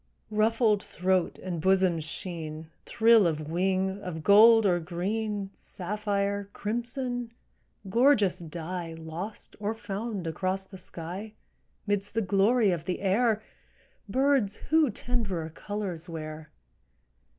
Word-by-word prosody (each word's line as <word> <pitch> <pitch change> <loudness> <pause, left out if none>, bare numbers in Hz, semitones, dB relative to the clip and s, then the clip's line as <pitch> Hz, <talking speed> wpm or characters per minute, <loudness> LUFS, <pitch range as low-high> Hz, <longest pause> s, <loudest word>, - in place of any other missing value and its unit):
Ruffled 215 0 +3
throat 190 -3 0
and 175 -4 -4
bosom's 185 -3 +3
sheen, 160 -1 -6 0.2
Thrill 225 -4 +5
of 155 -1 -3
wing, 190 +2 0
of 165 -5 -6
gold 220 +3 +7
or 180 -3 +3
green, 195 +4 -3
Sapphire, 200 +1 -2
crimson—gorgeous 235 -2 -1
dye 170 0 -5
Lost 165 +6 -7
or 210 +2 -2
found 205 -2 -4
across 185 +4 -2
the 190 -1 -12
sky, 180 +5 -7 0.5
'Midst 205 0 -1
the 225 - +2
glory 205 +3 +3
of 170 -2 -3
the 180 - -2
air, 215 +2 +2 0.7
Birds 260 -4 +2 0.2
who 315 -3 +5
tenderer 200 -9 -2
colors 185 -2 -5
wear? 155 -1 -7
195 Hz, 110 wpm, -28 LUFS, 175-220 Hz, 0.7 s, gold